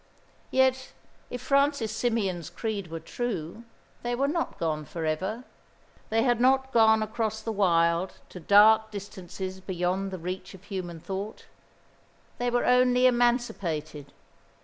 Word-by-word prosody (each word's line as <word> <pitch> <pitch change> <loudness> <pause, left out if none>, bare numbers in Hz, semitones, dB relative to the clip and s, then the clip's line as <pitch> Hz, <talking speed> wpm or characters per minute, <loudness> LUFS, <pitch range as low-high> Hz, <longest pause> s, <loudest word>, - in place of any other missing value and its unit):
Yet, 260 0 +2 0.4
if 245 0 -6
Francis 280 -5 +2
Symeon's 205 -8 -1
creed 210 -5 -4
were 165 0 -6
true, 215 +2 -5 0.4
they 240 0 -2
were 275 +3 +1
not 335 +3 -2
gone 155 -2 -1
for 165 +2 -5
ever. 190 +10 -2 0.7
They 225 +1 +2
had 240 -2 +2
not 265 +1 +3
gone 220 -1 +5
across 220 0 -3
the 225 - -2
wild 170 -3 +2 0.2
to 180 - -9
dark 215 +4 +6
distances 190 -2 -7
beyond 185 +1 -2
the 190 - -5
reach 185 +3 -6
of 190 - -16
human 185 -4 -6
thought. 195 +5 -6 0.9
They 245 0 +1
were 245 0 +1
only 250 0 +4
emancipated. 200 - 0
215 Hz, 135 wpm, -27 LUFS, 180-240 Hz, 0.9 s, dark